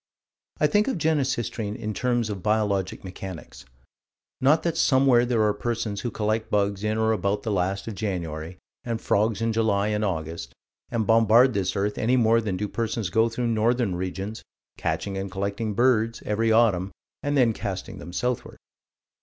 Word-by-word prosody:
I - - +4
think 210 0 +3
of 265 - 0
Genesistrine 130 -9 -1
in 110 0 -4
terms 120 -2 0
of 100 -2 -5
biologic 105 -3 0
mechanics: 90 -8 -9 0.7
not 150 +5 +4
that 170 -2 0
somewhere 130 -5 +4
there 115 -3 +2
are 105 -1 +3
persons 110 -2 -3
who 120 - -2
collect 110 0 -1
bugs 100 -1 0
in 110 0 0
or 110 0 +2
about 100 -1 0
the 110 - -2
last 95 +1 -1
of 115 - -4
January 90 -4 -4 0.3
and 115 -2 -3
frogs 110 +1 +1
in 115 0 +1
July 105 -2 +1
and 105 0 0
August, 80 - -3 0.4
and 115 -2 -1
bombard 115 +3 +5
this 95 -2 -1
earth, 100 +1 -1
any 125 +3 +2
more 115 -1 +4
than 100 -4 -2
do 105 +2 -2
persons 115 -3 -2
go 110 +4 +3
through 120 +2 -3
northern 115 -1 +1
regions, 95 +4 -4 0.3
catching 95 -1 -2
and 95 0 -4
collecting 100 +3 -3
birds, 115 -2 +2
every 110 +2 +1
autumn, 100 -5 +3 0.3
then 135 -5 +2
casting 100 -3 -5
them 85 - -9
southward. 125 +6 -2
110 Hz, 170 wpm, -25 LUFS, 100-115 Hz, 0.7 s, bombard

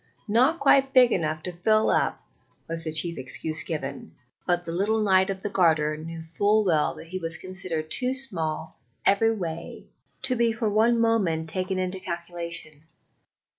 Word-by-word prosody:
"Not 255 +10 +3
quite 270 -1 +4
big 250 -2 +7
enough 155 -2 -1
to 180 - -4
fill 215 +5 +2
up," - - 0 0.4
was 165 0 -4
the 160 - -2
chief 165 +2 +1
excuse 155 +4 -2
given; 140 -4 -5 0.3
but 175 0 +1
the 165 - -4
little 210 +5 +1
Knight 190 -2 +4
of 190 -1 -4
the 205 - -2
Garter 160 -5 +2
knew 165 +1 -7
full 205 +6 +2
well 160 -5 +2
that 165 - -12
he 185 +1 -4
was 165 -2 -3
considered 185 -4 -5
too 255 0 +1
small 180 -13 -4 0.3
every 225 +3 +4
way 170 -6 -5 0.4
to 265 -1 +2
be 235 -1 +2
for 220 -2 -1
one 230 +3 +3
moment 190 -9 +1
taken 185 0 -2
into 185 0 -2
the 185 - -17
calculation. 170 -3 -5
180 Hz, 170 wpm, -26 LUFS, 160-215 Hz, 0.4 s, big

